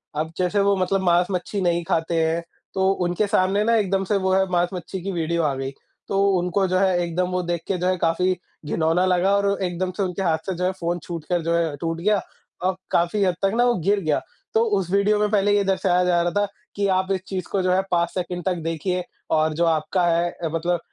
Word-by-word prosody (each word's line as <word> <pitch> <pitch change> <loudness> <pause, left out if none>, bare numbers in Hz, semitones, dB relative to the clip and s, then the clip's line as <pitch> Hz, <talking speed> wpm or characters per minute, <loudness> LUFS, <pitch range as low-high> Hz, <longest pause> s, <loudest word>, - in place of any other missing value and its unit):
अब 155 +2 -2
जैसे 185 +2 +1
वो 200 0 +3
मतलब 190 +1 +1
माँस-मच्छी 180 +3 +1
नहीं 175 -1 +1
खाते 165 +1 0
हैं 165 +1 0 0.3
तो 190 0 +2 0.2
उनके 175 +4 0
सामने 195 +2 +2
ना 230 +1 +3
एकदम 195 -3 +1
से 205 - +3
वो 190 -1 +1
है 190 0 +3
माँस-मच्छी 180 +1 -1
की 195 - -2
वीडियो 170 -1 -1
आ 145 -3 +1
गई। 135 0 -4 0.4
तो 195 0 +1 0.2
उनको 180 +2 +1
जो 185 0 +1
है 190 -2 +3
एकदम 175 +2 -1
वो 180 0 0
देख 175 -1 -2
के 190 - 0
जो 180 +1 -1
है 185 - +1
काफ़ी 180 +2 +1 0.3
घिनौना 165 +4 +1
लगा 185 +2 +3
और 200 0 +1
एकदम 180 +1 -2
से 200 - +1
उनके 185 +1 -3
हाथ 160 -3 +2
से 185 - -1
जो 180 - -2
है 185 - +2
फ़ोन 175 +1 -1
छूटकर 170 0 -3
जो 170 +1 0
है 165 -3 0
टूट 165 0 -2
गया, 205 +2 +2 0.4
और 185 +1 +1 0.2
काफ़ी 175 +4 +2
हद 180 -3 +2
तक 195 - +2
ना 240 - +4
वो 245 -1 +3
गिर 205 0 +4
गया। 155 -5 0 0.3
तो 220 - +4 0.2
उस 185 -3 -2
वीडियो 205 +1 +3
में 210 - +2
पहले 205 -1 +3
ये 200 - +3
दर्शाया 185 -2 +2
जा 175 -1 +3
रहा 175 0 0
था 205 - +3 0.3
कि 200 0 +1
आप 185 +1 0
इस 190 - 0
चीज़ 185 -2 -4
को 195 - +1
जो 185 - +1
है 185 - +3
5 170 -1 +2
सेकंड 180 -1 -3
तक 185 -2 +1
देखिए 175 +3 -2 0.3
और 155 0 +2
जो 170 +2 +1
आपका 165 +3 +1
है 170 +1 +2
अ, 165 - -5
मतलब 175 +1 0
180 Hz, 240 wpm, -23 LUFS, 170-195 Hz, 0.4 s, ना